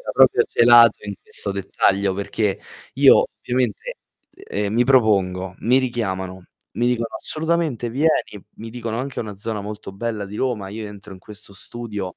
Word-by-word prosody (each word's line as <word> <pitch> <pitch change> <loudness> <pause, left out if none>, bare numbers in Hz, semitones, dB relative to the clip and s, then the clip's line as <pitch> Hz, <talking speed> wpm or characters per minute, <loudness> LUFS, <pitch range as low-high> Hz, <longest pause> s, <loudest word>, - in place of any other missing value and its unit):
era - - -5
proprio - - +5
celato 120 -2 +6
in 100 - -4
questo 100 - 0
dettaglio, 100 0 +1
perché 100 0 -2 0.3
io - - +6
ovviamente, 125 -3 -2 0.4
ehm, 100 0 -4
mi 120 +2 +3
propongo, 95 -7 +2
mi 125 +3 +3
richiamano, 95 -8 -3 0.3
mi 120 - 0
dicono: 115 -2 -1
"Assolutamente 160 -6 -1
vieni", 135 -6 0
mi 115 0 -8
dicono 115 -1 -4
anche 135 +2 -4
una 105 -3 -6
zona 105 +1 -4
molto 105 -1 -8
bella 105 0 -4
di 100 +2 -8
Roma, 115 -7 -2
io 110 +2 -6
entro 105 -1 -11
in 95 - -11
questo 105 +2 -7
studio, 105 -3 -5
110 Hz, 160 wpm, -21 LUFS, 100-120 Hz, 0.4 s, celato